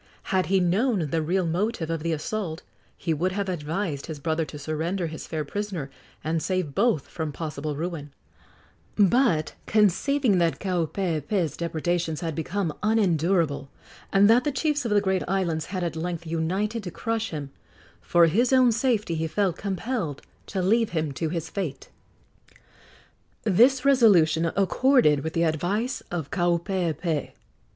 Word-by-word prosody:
Had 185 -1 +2
he 195 0 +3
known 185 - +1
the 165 - +1
real 180 +4 0
motive 175 0 -1
of 165 -2 -2
the 165 +1 -1
assault 165 +1 -3 0.3
he 165 - -1
would 180 +5 -1
have 200 0 -2
advised 165 -2 -3
his 160 -2 -5
brother 160 +1 -1
to 150 - -9
surrender 160 +5 -2
his 160 -1 -6
fair 155 -2 -3
prisoner 185 -5 -4 0.3
and 160 +2 -1
save 185 -6 -1
both 200 - +1
from 160 -3 -4
possible 150 -1 -4
ruin; 155 -2 -4 0.8
but, 200 - +3
conceiving 215 - +3
that 170 -1 +1
Kaupeepee's 175 -2 -1
depredations 170 -1 -2
had 165 -2 -2
become 165 +2 -2
unendurable, 170 -9 +1 0.4
and 200 +1 +5
that 235 +3 +5
the 295 - 0
chiefs 290 0 0
of 230 - -1
the 205 -1 +4
great 190 -2 +1
islands 170 -4 -1
had 185 -1 -3
at 170 -2 -2
length 170 +1 -4
united 185 +8 -1
to 190 - -6
crush 225 +4 -2
him, 145 -4 -6 0.5
for 170 -1 +4
his 230 +10 +2
own 255 -2 +5
safety 225 -5 0
he 160 0 -1
felt 185 +1 0
compelled 195 - -3 0.2
to 190 -2 -2
leave 225 +4 +3
him 155 -2 0
to 160 +4 -2
his 165 -1 -3
fate. 160 -7 -5 1.5
This 245 +6 +4
resolution 180 - +5
accorded 200 - +4
with 160 - -3
the 170 - +1
advice 180 - -1
of 165 -5 -4
Kaupeepee. 170 -3 -1
175 Hz, 150 wpm, -25 LUFS, 160-205 Hz, 1.5 s, and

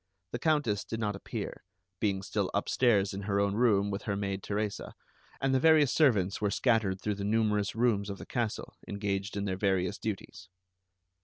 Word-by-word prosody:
The 120 - -3
Countess 140 -9 +1
did 115 - -5
not 105 -2 -1
appear, 100 - -6 0.4
being 100 -3 0
still 100 -1 -1
upstairs 100 -1 +2
in 100 - -4
her 100 0 0
own 100 0 +2
room 105 -3 +3
with 100 - -3
her 100 - -2
maid 100 -1 -2
Teresa, 105 0 -3 0.4
and 135 0 +1
the 130 - +4
various 155 -2 +5
servants 105 - +3
were 105 - +2
scattered 105 -5 +1
through 105 +2 -1
the 100 0 -5
numerous 105 -1 +1
rooms 110 -4 +1
of 100 - -5
the - - -9
castle 120 -3 -3
engaged 100 0 -2
in 100 - -1
their 95 -2 -2
various 95 -2 0
duties. 95 -3 -5
100 Hz, 180 wpm, -30 LUFS, 100-115 Hz, 0.4 s, various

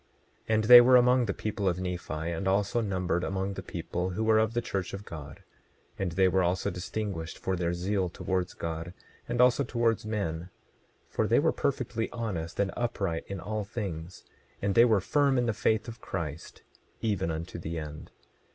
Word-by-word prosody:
27:27 110 - +2
And 110 - +2
they 120 +2 +11
were 125 +1 +6
among 125 0 +5
the - - +1
people 105 -2 -1
of 90 0 -2
Nephi, 90 -1 -4 0.2
and 85 +3 -3
also 100 +4 +2
numbered 95 -4 -1
among 95 +1 -2
the - - -6
people 90 +1 -3
who 95 +5 -2
were 110 0 +4
of 110 +1 +1
the - - +3
church 95 -4 -3
of 100 +1 -9
God. 75 -2 -9 0.6
And 90 -3 -1
they 95 +1 +4
were 95 +1 +2
also 90 +3 0
distinguished 90 -2 -4
for 95 - -2
their 85 -1 -1
zeal 95 +1 0
towards 90 0 -2
God, 85 +1 -5 0.3
and 120 0 -1
also 125 +2 +5
towards 115 -3 0
men; 90 -6 -3 0.6
for - - -1
they - - +4
were - - +4
perfectly 115 0 -1
honest 95 -9 -4
and 100 -1 +1
upright 100 -8 -2
in 100 -1 -5
all 105 +3 -3
things; 95 -5 -6 0.4
and 100 0 0
they 115 +3 +7
were 110 -5 +3
firm 140 +4 +2
in 120 - +2
the 115 - +1
faith 110 +1 +1
of 115 -1 -8
Christ, 80 -4 -6 0.4
even 100 -5 0
unto 85 +2 -5
the 85 0 -4
end. 75 -1 -7
95 Hz, 190 wpm, -29 LUFS, 85-110 Hz, 0.6 s, they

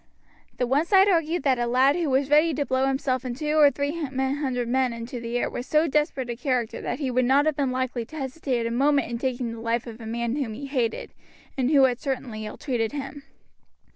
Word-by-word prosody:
The 250 - +1
one 280 +7 +1
side 385 0 +6
argued 330 -4 +1
that 265 -3 +2
a 240 - 0
lad 260 +4 +4
who 340 -4 -1
was 270 +1 +1
ready 305 +1 +4
to 285 - -1
blow 260 0 +1
himself 265 -1 -1
and 250 -2 -5
two 300 +1 0
or 290 -1 +8
three 285 +4 -3
hundred 265 -2 -1
men 255 0 +1
into 230 +2 -6
the 235 +1 -3
air - - 0
was 245 - -6
so 310 +2 +3
desperate 295 -3 0
a - - -4
character 250 -3 -2
that - - -3
he 275 -4 -2
would 255 +1 +2
not 270 +4 +4
have 310 -2 +1
been 275 -2 0
likely 255 -1 -2
to 315 - -13
hesitate 265 -4 -2
a 230 - -2
moment 280 +1 +2
in 235 - -3
taking 250 -2 -2
the 230 - -7
life 230 +1 -1
of 230 -1 -9
a 220 - -7
man 235 +3 -2
whom 240 -7 -3
he 280 +5 -7
hated, 250 -5 -2 0.4
and 260 -1 0
who 285 -3 +5
had 250 -2 +2
certainly 250 -6 -4
ill 215 - -8
treated 240 -5 -2
him. 285 0 -6
265 Hz, 235 wpm, -25 LUFS, 240-285 Hz, 0.4 s, or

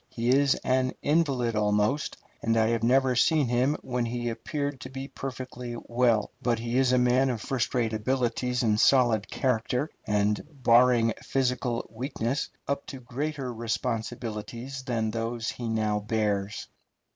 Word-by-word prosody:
He 115 +1 -2
is 140 +1 +4
an 130 0 +1
invalid 140 -7 +1
almost, 105 +6 +1 0.2
and 115 0 +1
I 110 0 +3
have 115 -1 0
never 130 +2 +3
seen 150 +4 +4
him 125 +5 +2
when 125 -1 -1
he 120 0 -2
appeared 140 +3 -3
to 130 - -7
be 135 +1 -6
perfectly 130 -3 -6
well; 120 -3 +2
but 120 -3 +1
he 120 +2 -1
is 130 -1 +3
a 125 - +4
man 125 +2 +3
of 120 -3 -2
first 130 +3 -2
rate 115 -3 +1
abilities 125 +2 0
and 110 -2 +2
solid 120 -6 +4
character, 125 +3 0 0.2
and, 105 0 +1
barring 120 -3 +4
physical 125 -2 -1
weakness, 130 +2 -2 0.2
up 140 0 -2
to - - -7
even 130 -2 -12
greater 140 -1 -3
responsibilities 115 +2 -4
than 115 -4 -1
those 115 +1 -2
he 120 -2 -5
now 110 -2 +1
bears. 105 -2 -1
120 Hz, 155 wpm, -27 LUFS, 115-130 Hz, 0.2 s, is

